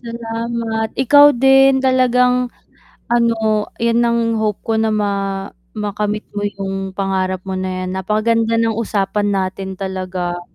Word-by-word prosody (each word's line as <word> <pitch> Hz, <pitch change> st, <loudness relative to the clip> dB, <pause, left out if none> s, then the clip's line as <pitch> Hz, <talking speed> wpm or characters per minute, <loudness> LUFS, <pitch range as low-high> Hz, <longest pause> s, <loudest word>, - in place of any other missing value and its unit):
Salamat, 230 Hz, -1 st, -3 dB
ikaw 285 Hz, +1 st, +6 dB
din 270 Hz, +1 st, +5 dB
talagang 250 Hz, -1 st, +3 dB, 0.6 s
ano 220 Hz, -3 st, +1 dB
'yan 235 Hz, 0 st, +1 dB
ang 235 Hz, 0 st, +2 dB, 0.2 s
hope 210 Hz, -2 st, -1 dB
ko 225 Hz, -, -1 dB
na 220 Hz, -, +1 dB
ma 205 Hz, -1 st, 0 dB, 0.6 s
makamit 210 Hz, 0 st, -2 dB
mo 205 Hz, -, -4 dB
yung 195 Hz, -1 st, -5 dB
pangarap 185 Hz, -1 st, -1 dB
mo 190 Hz, -, -5 dB
na 185 Hz, 0 st, -3 dB
'yan, 185 Hz, -, -4 dB
napakaganda 220 Hz, +4 st, 0 dB
ng 230 Hz, 0 st, +1 dB
usapan 205 Hz, -1 st, -1 dB
natin 190 Hz, -1 st, -3 dB
talaga. 185 Hz, -2 st, -4 dB
215 Hz, 130 wpm, -18 LUFS, 195-235 Hz, 0.6 s, ikaw